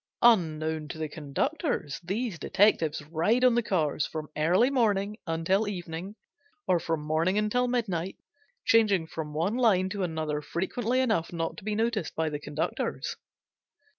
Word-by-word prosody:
Unknown 160 -8 +3
to 155 - -7
the 160 0 -2
conductors 155 - -2
these 195 0 -2
detectives 165 -7 +2
ride 170 +11 +1
on 250 -1 +6
the 240 - +3
cars 160 -9 0
from 155 -1 -6
early 180 - +3
morning 210 -5 +1
until 165 +6 +1
evening, 180 0 -5 0.5
or 180 -2 +3
from 165 -2 -2
morning 165 +5 +1
until 215 +4 +1
midnight, 195 -8 -1 0.5
changing 210 -7 +4
from 160 -1 -6
one 170 +8 0
line 195 -7 +3
to 200 0 -4
another 160 -4 -2
frequently 235 - -1
enough 220 -10 0
not 165 -1 -2
to - - -10
be 210 0 -2
noticed 225 -4 -1
by 160 -1 0
the 145 -1 -4
conductors. 150 +1 -3
180 Hz, 150 wpm, -28 LUFS, 160-220 Hz, 0.5 s, on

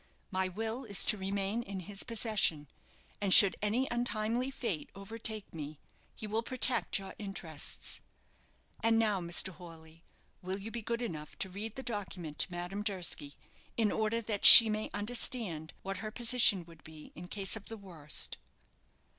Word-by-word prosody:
My 190 0 -2
will 225 +7 -5
is 205 -5 -2
to 215 - +2
remain 195 +3 -3
in 195 -5 -8
his 195 +2 -2
possession; 215 -10 0 0.5
and 200 -2 -2
should 195 0 +8
any 225 +6 -1
untimely 240 +1 -3
fate 220 - -5
overtake 215 +1 -6
me, 150 -2 -9 0.4
he - - -9
will 215 +2 -3
protect 250 0 +1
your 195 -1 -9
interests. 190 -7 -4 0.8
And 225 0 +2
now, 210 -4 0
Mr. 175 +2 +2
Horley, 165 -2 -15 0.4
will 185 +2 -4
you 215 +3 -9
be 235 - -6
good 235 +2 -4
enough 155 -9 -8
to 190 - -4
read 205 +4 -8
the 265 - -8
document 185 - -6
to - - 0
Madame 175 +3 -6
Durski, 180 -8 -4 0.4
in 220 -3 +1
order 220 +1 -2
that 210 -2 -5
she 230 -1 +13
may 215 0 -4
understand 205 -7 -2
what 195 0 -5
her 215 - -6
position 230 -5 +4
would 165 -2 -18
be 155 -1 -14
in 175 +1 -11
case 195 +1 -3
of 210 -2 -11
the 225 - -8
worst?" 170 -8 -6
200 Hz, 165 wpm, -31 LUFS, 180-225 Hz, 0.8 s, she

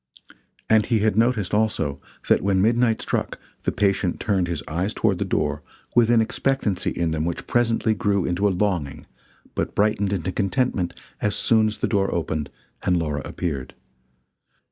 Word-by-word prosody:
And, 110 -1 +4
he 115 -3 +2
had 110 -2 +2
noticed, 115 -4 +1
also, 80 -10 0 0.3
that - - +4
when 95 -1 +2
midnight 115 +2 +2
struck, - - -2 0.3
the - - +2
patient 95 -3 0
turned 95 -4 +1
his 85 -3 -3
eyes 90 +7 -2
toward 100 -5 +1
the 100 - 0
door, 75 -5 -1 0.3
with 120 -2 +4
an 120 -1 +5
expectancy 110 -4 0
in 85 -1 -1
them 80 -1 -1
which 85 +1 -3
presently 115 -2 +2
grew 100 -2 0
into 90 +4 +1
a - - +3
longing 90 -7 -1 0.5
but - - -3
brightened 105 -1 +2
into 95 -2 -1
contentment 100 -2 -1 0.2
as 105 -1 +1
soon 110 -1 +3
as 105 - -3
the - - 0
door 100 -2 +1
opened 80 -3 -2 0.3
and 90 -1 +2
Laura 75 -4 -1
appeared. 70 -7 -4
100 Hz, 165 wpm, -23 LUFS, 85-110 Hz, 0.5 s, an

